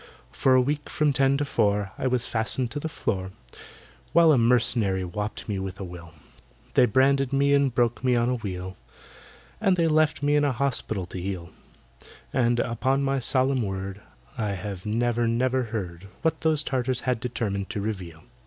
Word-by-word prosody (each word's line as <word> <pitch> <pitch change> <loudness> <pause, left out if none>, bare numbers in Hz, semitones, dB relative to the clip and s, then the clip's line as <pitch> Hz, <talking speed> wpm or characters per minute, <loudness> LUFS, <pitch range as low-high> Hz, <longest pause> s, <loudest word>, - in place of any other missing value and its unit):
For 130 -1 +3
a 130 - +6
week 145 +2 -2
from 150 -2 +1
ten 135 +1 +3
to 145 - -1
four 100 -6 +1
I - - -2
was 125 -1 0
fastened 115 +2 -1
to 145 - -3
the 160 - -4
floor, 95 -10 -2 0.8
While 165 -1 +6
a 145 - +5
mercenary 115 -5 +2
wopped 105 +6 -5
me 100 -3 -2
with 95 0 -5
a - - -4
will 85 -2 -9 0.6
They 125 - +5
branded 135 +3 +3
me 140 +1 +3
and 140 -2 +3
broke 120 +1 0
me 125 -1 +3
on 120 0 +2
a 125 - +1
wheel, 95 -5 -5 0.8
And 190 -2 +2
they 165 -1 +3
left 155 -2 +2
me 145 +1 +3
in 145 - +3
an 140 -2 +2
hospital 115 -6 0
to 90 +1 -7
heal; 90 -3 -5 0.8
And, 120 -1 +2
upon 130 +4 0
my 135 0 +1
solemn 130 +1 +1
word, 95 -1 -4 0.4
I 105 -2 -1
have 100 +1 -6
never 120 +2 +1
never 125 +2 +1
heard 100 -5 -5 0.2
What 160 -1 0
those 155 -2 +2
Tartars 130 -2 -1
had 125 -3 0
determined 105 -5 -3
to 105 - -3
reveal. 95 -6 -5
120 Hz, 180 wpm, -26 LUFS, 100-135 Hz, 0.8 s, a